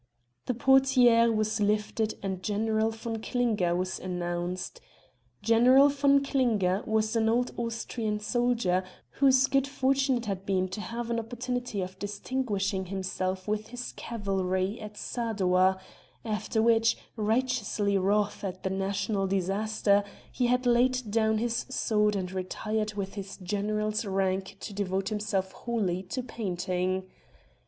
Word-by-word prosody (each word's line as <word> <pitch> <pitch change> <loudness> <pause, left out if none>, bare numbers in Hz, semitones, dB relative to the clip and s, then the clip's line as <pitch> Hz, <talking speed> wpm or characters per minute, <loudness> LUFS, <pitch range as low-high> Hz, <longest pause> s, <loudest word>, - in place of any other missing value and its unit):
The 250 - 0
portière 250 -2 +5
was 215 0 0
lifted 210 +1 0
and 190 -2 -3
General 220 +2 +1
von 225 0 -5
Klinger 220 -9 +1
was 185 +1 -2
announced. 175 0 -4 0.6
General 250 +5 +6
von 280 0 +3
Klinger 215 -9 +1
was 220 +1 +1
an 220 -1 +3
old 245 +2 +1
Austrian 230 -2 -3
soldier 230 -5 +1 0.3
whose 265 -1 +4
good 275 0 +1
fortune 270 -1 +1
it 235 - -5
had 195 -2 -3
been 190 -1 0
to 190 +3 -5
have 235 +1 -4
an 230 - +1
opportunity 245 -1 -3
of 185 +1 -6
distinguishing 205 -3 -2
himself 185 0 -3
with 215 0 -1
his 245 0 -6
cavalry 195 -2 -2
at 210 -1 -9
Sadowa, 190 -5 +1 0.5
after 220 0 -1
which, 230 0 +4 0.2
righteously 220 -2 0
wroth 205 +2 +1
at 185 -1 -5
the 190 - -1
national 195 +1 -1
disaster, 200 +2 +1 0.3
he 245 - 0
had 250 +1 +1
laid 245 -1 +2
down 220 0 +2
his 235 +1 -1
sword 210 -5 +1
and 185 -2 -3
retired 215 +3 -3
with 195 -1 -4
his 195 -1 -7
General's 210 +3 -1
rank 190 -1 -1
to 205 - -6
devote 195 -1 -1
himself 205 -3 -1
wholly 200 -7 -2
to 195 +7 -5
painting. 185 -4 -2
215 Hz, 135 wpm, -28 LUFS, 190-235 Hz, 0.6 s, General